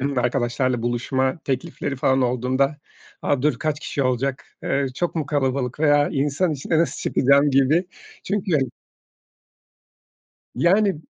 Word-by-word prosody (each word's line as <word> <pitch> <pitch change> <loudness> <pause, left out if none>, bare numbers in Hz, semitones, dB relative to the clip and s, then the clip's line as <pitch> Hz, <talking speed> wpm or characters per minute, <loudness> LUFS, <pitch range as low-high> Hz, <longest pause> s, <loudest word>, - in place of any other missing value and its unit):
bi 140 -1 0
arkadaşlarla 120 0 0
buluşma 130 +4 -1
teklifleri 140 0 -3
falan 130 0 +2
olduğunda 130 +4 0 0.5
a, 140 -2 0
dur 150 -5 +1
kaç 150 +1 -2
kişi 140 - -2
olacak, 130 +1 -1 0.2
eee, 140 0 0
çok 175 +5 -2
mu 155 -3 -2
kalabalık 135 -2 -1
veya 145 -1 +4
insan 145 +5 0
içine 150 +3 -1
nasıl 165 - +1
çıkacağım 140 +2 +3
gibi. 140 +6 +3 0.4
Çünkü 200 -1 -2 2.0
Yani, 190 - +3
140 Hz, 125 wpm, -22 LUFS, 130-150 Hz, 2.0 s, veya